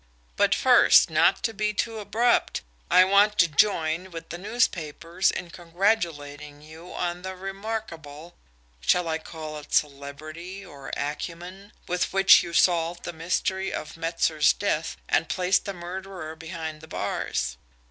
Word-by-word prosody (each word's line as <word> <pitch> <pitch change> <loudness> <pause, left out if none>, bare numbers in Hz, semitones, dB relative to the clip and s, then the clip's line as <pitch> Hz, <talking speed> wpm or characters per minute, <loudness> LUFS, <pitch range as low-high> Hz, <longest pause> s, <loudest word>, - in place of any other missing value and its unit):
But - - +3
first, - - +6
not - - +3
to 225 - 0
be 210 0 -1
too 225 +1 -2
abrupt, 220 +4 +1 0.3
I 185 - +7
want 200 +2 +4
to 170 - +5
join 165 +1 +1
with 165 -2 -9
the 170 - -6
newspapers 180 -5 0
in 175 -1 -4
congratulating 165 -6 -2
you 160 +3 -12
on 175 0 -3
the 190 0 -6
remarkable 185 -5 -6 0.5
shall 170 - +2
I 160 0 -1
call 155 -1 -8
it 150 - -15
celerity, 155 +7 -3
or 140 -6 -10
acumen? 175 +7 -6 0.2
with 180 0 -1
which 195 -1 +7
you 170 - -6
solved 170 0 +2
the 175 - -5
mystery 185 +3 -1
of 150 - -5
Metzer's 165 -2 +2
death, 165 -5 -2
and 160 - +1
placed 180 0 +1
the 200 - -3
murderer 175 -2 -7
behind 160 -1 -7
the 160 - -12
bars. 100 - -3
170 Hz, 145 wpm, -26 LUFS, 155-190 Hz, 0.5 s, I